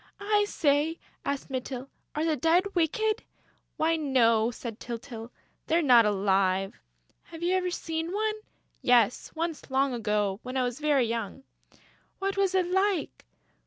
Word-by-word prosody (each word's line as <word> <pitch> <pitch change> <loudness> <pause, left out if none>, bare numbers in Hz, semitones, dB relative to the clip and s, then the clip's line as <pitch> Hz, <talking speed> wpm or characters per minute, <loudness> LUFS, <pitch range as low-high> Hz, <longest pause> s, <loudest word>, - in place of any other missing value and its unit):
"I 415 0 +2
say," 300 +2 +1 0.3
asked 280 -1 -3
Mytyl, 260 0 -4 0.3
"are 305 +2 0
the 320 -2 +2
Dead 345 +8 +2
wicked?" 425 +6 +1 0.6
"Why, 325 +1 +2
no," 235 -6 +3
said 235 -2 -7
Tyltyl, 235 -1 -7 0.4
"they're 330 +1 +2
not 240 -5 +6
alive!..." 195 -1 +1 0.5
"Have 330 0 -9
you 355 +2 +2
ever 370 -1 +1
seen 325 -1 -3
one?" 430 +2 0 0.5
"Yes, 245 -2 +3
once, 330 -2 -3
long 270 0 +1
ago, 210 -4 0
when 255 +1 -5
I 255 - +2
was 245 +1 -3
very 295 -4 +3
young...." 230 +2 -4 0.7
"What 390 0 -2
was 390 -1 +1
it 370 -1 +3
like?" 380 -1 0
280 Hz, 145 wpm, -28 LUFS, 235-345 Hz, 0.7 s, not